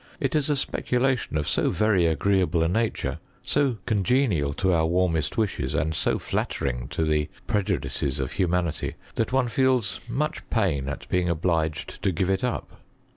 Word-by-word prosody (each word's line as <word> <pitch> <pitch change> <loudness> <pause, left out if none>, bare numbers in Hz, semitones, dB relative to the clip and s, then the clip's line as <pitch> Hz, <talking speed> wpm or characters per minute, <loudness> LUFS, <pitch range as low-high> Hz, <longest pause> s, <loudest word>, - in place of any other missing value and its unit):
It 135 +2 -1
is 150 -1 +1
a 145 - +3
speculation 125 - 0
of 75 - -1
so - - +1
very 100 -6 +3
agreeable 90 +1 +2
a - - +2
nature, 110 +6 -1 0.2
so 135 -5 +1
congeniaJ 100 - +1
to 95 -2 +2
our 80 -1 +3
warmest 85 -4 +1
wishes, 110 -3 -1
and 80 +2 0
so - - +1
flattering 60 -3 -2
to 80 - -2
the 75 -1 +1 0.2
prejudices 75 -8 0
of 65 -2 -2
hu 95 - +1
manity, 85 -2 -1 0.2
that 115 - -1
one 130 -1 +2
feels 120 -5 +1
much 145 +6 -1
pain 80 - +1
at 65 -4 -6
being 90 -1 +1
obliged 80 -2 -1
to 95 -1 +2
give 95 +2 0
It 95 +6 0
up. 125 - -3
95 Hz, 170 wpm, -25 LUFS, 80-115 Hz, 0.2 s, a